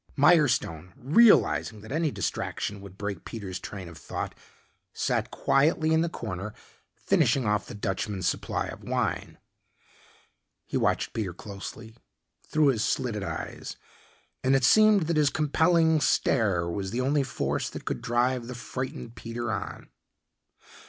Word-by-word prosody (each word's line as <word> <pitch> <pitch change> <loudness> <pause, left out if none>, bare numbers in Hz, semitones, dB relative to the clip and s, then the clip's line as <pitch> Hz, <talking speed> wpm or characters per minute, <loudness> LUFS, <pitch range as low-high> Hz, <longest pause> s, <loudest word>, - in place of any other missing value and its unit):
Mirestone, 130 - +3
realizing 140 - +4
that 110 - -11
any 160 +2 +1
distraction 100 -6 -3
would 100 -1 -12
break 100 -4 -4
Peter's 100 -5 -6
train 95 -4 -7
of 85 -3 -11
thought, - - -5 0.6
sat - - 0
quietly 155 +3 +2
in 160 - +4
the 170 - 0
corner 105 - -5 0.4
finishing 135 -3 +2
off 105 0 0
the 120 - -8
Dutchman's 95 -2 -2
supply - - -1
of - - -8
wine. - - -2 1.3
He - - -6
watched - - +1
Peter 95 -6 -3
closely 110 +3 -8 0.5
through 150 -2 +3
his 115 -5 +1
slitted 120 -6 -1
eyes, - - -5 0.7
and 130 +1 +4
it 135 - +2
seemed 215 +7 +6
that 165 0 0
his 150 -2 +4
compelling 160 +1 +3
stare 100 -13 +2
was 95 +3 -3
the 120 +5 -1
only 140 +3 +2
force 130 -2 -2
that - - -9
could - - -3
drive 120 0 0
the 125 - -6
frightened 125 -1 -5
Peter 120 0 -4
on. 100 -2 -5
120 Hz, 140 wpm, -27 LUFS, 100-145 Hz, 1.3 s, seemed